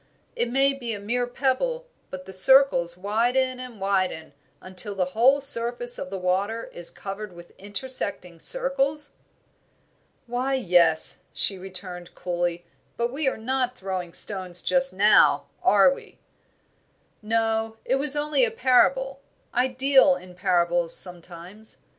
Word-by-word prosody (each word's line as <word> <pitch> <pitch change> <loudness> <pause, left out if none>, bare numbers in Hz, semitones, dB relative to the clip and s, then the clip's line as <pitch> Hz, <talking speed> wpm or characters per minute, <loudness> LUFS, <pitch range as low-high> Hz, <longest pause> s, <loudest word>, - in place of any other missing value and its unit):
It 240 - -2
may 270 +2 +2
be 240 -4 -5
a - - -8
mere 245 +4 -2
pebble, 290 - -2 0.2
but 185 0 -9
the 190 - -11
circles 185 -5 +4
widen 245 +6 0
and 250 -4 -10
widen 185 -6 -2 0.3
until 185 +2 -4
the 185 -2 0
whole 265 +5 +3
surface 240 -2 0
of 185 - -6
the 195 - -5
water 195 +5 -2
is 175 -1 -6
covered 195 0 -8
with 175 0 -14
intersecting 200 -5 -5
circles?" 280 - 0 1.1
"Why, 250 +3 -2
yes," 175 -9 +2
she 195 -2 +1
returned, 180 -2 -9
coolly, 175 -1 -3 0.3
"but 235 +1 -2
we 285 0 -2
are 265 - -1
not 250 +2 -2
throwing 185 -2 -5
stones 185 -3 +2
just 270 0 +1
now, 205 +3 +4 0.2
are - - +4
we?" 465 -3 -14 1.0
"No, 225 0 -1
it 260 - +1
was 285 +1 +3
only 295 -2 +1
a 235 - +3
parable; 265 +3 +1 0.3
I 250 +1 +1
deal 260 -5 +3
in 180 0 -12
parables 175 -2 +1
sometimes. 180 +4 +1
220 Hz, 135 wpm, -24 LUFS, 185-260 Hz, 1.1 s, circles